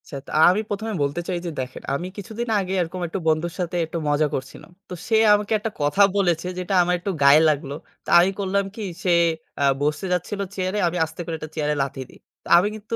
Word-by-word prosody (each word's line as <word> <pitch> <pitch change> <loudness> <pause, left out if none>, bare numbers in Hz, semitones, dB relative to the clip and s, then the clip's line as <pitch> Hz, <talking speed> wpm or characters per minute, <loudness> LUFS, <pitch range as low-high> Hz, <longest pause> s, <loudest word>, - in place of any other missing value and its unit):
সেত 140 -2 -8 0.2
আমি 185 +4 +4
১ম 205 +2 -3
এ - - -3
বলতে 145 +5 -2
চাই 180 -2 -2
যে 170 - -3
দেখেন, 130 0 -7
আমি 175 +6 -4
কিছুদিন 220 +4 -5
আগে 190 -1 -3
এরকম 175 +2 -4 0.3
বন্ধুর 160 +2 +1
সাথে 175 -1 -2
একটু 160 +1 -5
মজা 145 +1 +2
করছিলাম। 130 +5 -6 0.2
তো - - -6
সে 225 - +3 0.2
আমাকে 210 0 0
একটা 220 +1 -4
কথা 145 +7 +2 0.2
বলেছে 175 -3 +1
যেটা 180 +2 -3
আমার 180 +1 +1
একটু 195 +3 -3
গায়ে 140 +3 +7
লাগলো। 140 -2 -2 0.3
তা - - -8
আমি 180 +3 +4
করলাম 200 0 0
কি 220 - -6 0.2
সে 185 - +2 0.5
আ - - +3 0.2
বসতে 150 +6 -1
যাচ্ছিলো 200 +3 -2
চেয়ারে 185 +2 -1
আমি 175 +1 -2
আস্তে 160 +1 -14
করে 165 - -4
একটা 155 - -7
চেয়ারে 150 -1 0
লাথি 135 0 -6
দিই। - - -17 0.3
তা - - -9
আমি 190 - +1
কিন্তু 215 +1 -5
175 Hz, 220 wpm, -23 LUFS, 155-200 Hz, 0.5 s, গায়ে